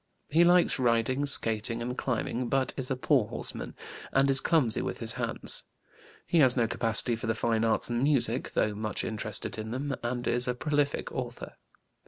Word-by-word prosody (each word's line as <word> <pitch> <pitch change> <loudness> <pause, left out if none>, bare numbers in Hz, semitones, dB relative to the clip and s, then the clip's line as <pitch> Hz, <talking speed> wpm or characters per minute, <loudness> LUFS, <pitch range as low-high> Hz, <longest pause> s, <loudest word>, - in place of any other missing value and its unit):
He 165 +4 +4
likes 175 -4 +3
riding, 125 +3 +1
skating, 115 -3 +3
and 125 +1 -4
climbing, 125 -1 -3
but 135 -2 0
is 130 -2 -4
a 135 - -1
poor 130 -3 +1
horseman, - - -4 0.4
and 135 +1 +2
is 135 - +2
clumsy 145 -10 +1
with - - -4
his - - -2
hands. - - -1 0.6
He 170 - +1
has 130 -3 +6
no 115 -2 +2
capacity 115 +1 +3
for 115 - -6
the 110 - 0
fine 115 -1 0
arts 115 -1 +1
and 120 0 -1
music, 130 -4 +1
though 105 - 0
much 105 0 -4
interested 110 -1 -3
in 110 0 -6
them, 135 +4 -3
and 120 +1 -4
is 120 +1 +2
a 125 - -1
prolific 145 +1 -1
author. 125 -2 -6
125 Hz, 185 wpm, -28 LUFS, 115-135 Hz, 0.6 s, has